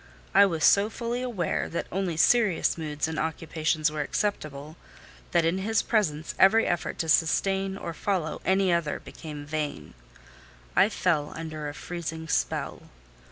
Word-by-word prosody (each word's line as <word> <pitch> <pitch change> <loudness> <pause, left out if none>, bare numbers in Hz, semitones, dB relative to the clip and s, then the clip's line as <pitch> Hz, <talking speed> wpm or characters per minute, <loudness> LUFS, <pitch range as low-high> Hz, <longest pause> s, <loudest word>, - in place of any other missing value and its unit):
I 200 0 +7
was 165 -4 0
so 200 +2 +5
fully 235 +2 -3
aware 220 -10 -2
that 170 - -3
only 185 -4 -2
serious 210 -1 +3
moods 150 -2 -3
and 160 -1 -3
occupations 160 -1 -1
were 155 -1 -2
acceptable, 150 -4 -3 0.5
that 170 -2 +2
in 170 +3 +1
his 220 +3 +1
presence 165 -9 0
every 220 +4 +6
effort 175 - -2
to 165 - -2
sustain 190 +5 +2
or 170 -3 -5
follow 180 -2 -2
any 190 -1 +3
other 170 -3 0
became 150 -2 -9
vain: 150 - -4 0.8
I 195 - +5
fell 165 -8 0
under 155 -2 -5
a 145 - -8
freezing 160 -2 -6
spell. - - -1
165 Hz, 150 wpm, -27 LUFS, 155-195 Hz, 0.8 s, I